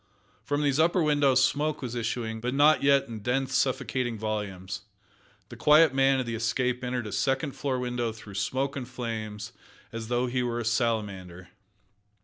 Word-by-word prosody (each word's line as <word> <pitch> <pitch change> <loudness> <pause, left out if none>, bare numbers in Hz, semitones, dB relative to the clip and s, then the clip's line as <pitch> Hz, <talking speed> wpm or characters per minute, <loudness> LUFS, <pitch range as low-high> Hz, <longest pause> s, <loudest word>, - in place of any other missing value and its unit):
From 145 +1 -1
these 140 0 +1
upper 170 +2 +3
windows 140 -4 +4
smoke 150 0 -1
was 120 -2 -4
issuing, 115 -1 -3
but 125 +3 -2
not 150 +2 +5
yet 140 0 +4
in 115 -2 -7
dense, 130 +4 -1
suffocating 130 -3 0
volumes. 100 -4 -4 0.7
The - - -9
quiet 150 -1 +5
man 135 0 +3
of 130 - -1
the 115 - -4
Escape 125 +3 -1
entered 125 -1 -2
a 105 - -6
second 135 +5 0
floor 135 -1 -2
window 125 -2 -2
through 110 -2 -12
smoke 130 +8 -1
and 130 -3 -5
flames 110 -3 -5 0.4
as 115 -1 -6
though 120 +1 +1
he 125 0 -1
were 120 -1 -2
a 120 - -4
salamander. 100 -7 -2
125 Hz, 170 wpm, -27 LUFS, 110-135 Hz, 0.7 s, not